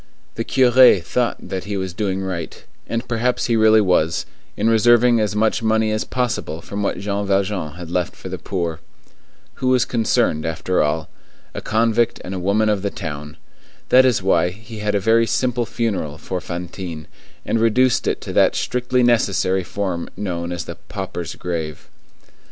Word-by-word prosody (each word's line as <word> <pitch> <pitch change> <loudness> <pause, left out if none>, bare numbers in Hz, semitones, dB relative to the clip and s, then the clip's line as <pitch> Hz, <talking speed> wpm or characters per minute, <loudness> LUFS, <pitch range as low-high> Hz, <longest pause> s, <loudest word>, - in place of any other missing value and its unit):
The 115 - -3
curé 125 -7 +5
thought 120 +7 -1
that 95 -1 -4
he 100 0 -3
was 95 -2 -3
doing 95 -1 -2
right, 90 -4 -5 0.2
and 115 +1 -3
perhaps 120 +1 0
he 120 - +1
really 110 0 +5
was, 85 -4 +1 0.3
in 105 - +1
reserving 120 +1 +5
as 105 -1 0
much 110 +2 +1
money 110 -1 +2
as 110 - -1
possible 120 -11 -2
from 100 +4 -6
what 100 - -1
Jean 100 0 -2
Valjean 95 -5 0
had 85 0 -9
left 90 0 -1
for - - -9
the - - -5
poor. 85 -4 -3 0.8
Who 130 - 0
was 130 -1 +3
concerned, 110 -10 +1
after 80 +3 0
all? 80 +1 0 0.5
A - - -5
convict 115 +1 +1
and 95 - -6
a 95 - -3
woman 100 +4 +1
of 105 -2 +1
the 100 - -1
town. 75 -4 -7 0.5
That 130 +1 +7
is 125 -7 +2
why 90 -2 +3
he 110 +4 -10
had 105 0 -1
a - - +3
very 115 +3 +3
simple 125 -2 0
funeral 100 -12 -2
for 90 +3 -5
Fantine, 85 -2 -6 0.4
and 115 - 0
reduced 120 +2 +3
it - - -1
to - - -6
that - - +4
strictly 125 0 0
necessary 100 -5 +2
form 90 -2 -3
known 85 -4 -3
as 85 -1 -4
the 85 - -7
pauper's 95 -4 -5
grave. 80 -4 -5
100 Hz, 175 wpm, -20 LUFS, 90-115 Hz, 0.8 s, That